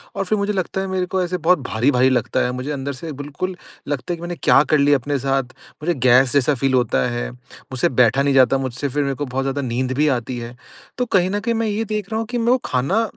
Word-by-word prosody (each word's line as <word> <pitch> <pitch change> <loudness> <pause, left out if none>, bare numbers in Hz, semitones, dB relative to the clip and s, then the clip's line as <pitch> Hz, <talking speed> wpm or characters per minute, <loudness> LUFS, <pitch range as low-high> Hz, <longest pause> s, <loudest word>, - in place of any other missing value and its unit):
और 195 - -2
फिर 215 +3 0
मुझे 200 +1 -1
लगता 190 0 -2
है 195 - -3
मेरे 185 -1 -1
को 185 +1 -1
ऐसे 180 +1 -2
बहुत 175 0 +3
भारी-भारी 125 +3 +3
लगता 120 -3 0
है 125 - -1
मुझे 130 +3 -4
अंदर 140 0 -3
से 155 +5 -7
बिल्कुल 150 +6 -4 0.3
लगता 140 +2 -3
है 170 - -5
कि - - -13
मैंने 175 0 -4
क्या 135 - +6
कर 155 - +2
लिया 145 0 +4
अपने 140 +3 -2
साथ? 135 0 0 0.4
मुझे 175 +2 +1
गैस 125 +1 +5
जैसा 140 +1 +3
फील 135 +1 0
होता 125 -2 +2
है, 120 0 -3
मुझसे 125 0 -4
बैठा 125 +1 +3
नहीं 140 - +2
जाता 130 0 +5
मुझसे 135 +1 -3
फिर 145 +2 -1
मेरे 135 -1 -1
को 145 - -3
बहुत 135 +1 -2
ज़्यादा 135 +1 -1
नींद 130 0 -2
भी 150 +1 +3
आती 120 +1 -6
है। 120 +1 -8 0.4
तो 250 - 0
कहीं 185 -5 +2
न 205 - 0
कहीं 230 +2 -1
मैं 225 0 0
ये 215 +2 -1
देख 210 -1 -4
रहा 220 - -1
हूँ 225 - -3
कि 245 - -1
मैं 235 +1 +2
वो 255 - +5
खाना 140 - +1
140 Hz, 265 wpm, -20 LUFS, 130-185 Hz, 0.4 s, क्या